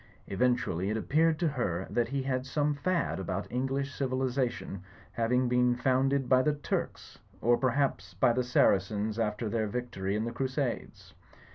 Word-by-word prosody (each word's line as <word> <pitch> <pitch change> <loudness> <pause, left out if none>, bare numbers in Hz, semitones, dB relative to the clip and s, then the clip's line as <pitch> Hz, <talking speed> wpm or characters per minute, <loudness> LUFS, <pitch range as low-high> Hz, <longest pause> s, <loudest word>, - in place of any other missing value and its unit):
Eventually 100 -4 0
it 110 - 0
appeared 155 +7 +2
to 170 0 +1
her 95 - -1
that 120 -1 +1
he 135 +2 -2
had 130 -1 -2
some 145 +2 +1
fad 170 - -1
about 95 - -3
English 135 +2 -1
civilisation 130 -6 -2 0.3
having 125 +2 +1
been 125 0 +3
found 130 +2 +2
ed 140 -2 0
by 130 -1 +5
the 150 +3 +2
Turks; 145 - -4 0.2
or, 120 +2 +4
perhaps 125 -8 0
by 115 +6 +3
the 125 - +1
Saracens 105 -2 +2
after 110 0 -1
their 110 0 0
victory 100 -4 -3
in 110 +1 -1
the 120 - -3
Crusades. 130 +1 -3
125 Hz, 160 wpm, -30 LUFS, 110-135 Hz, 0.3 s, by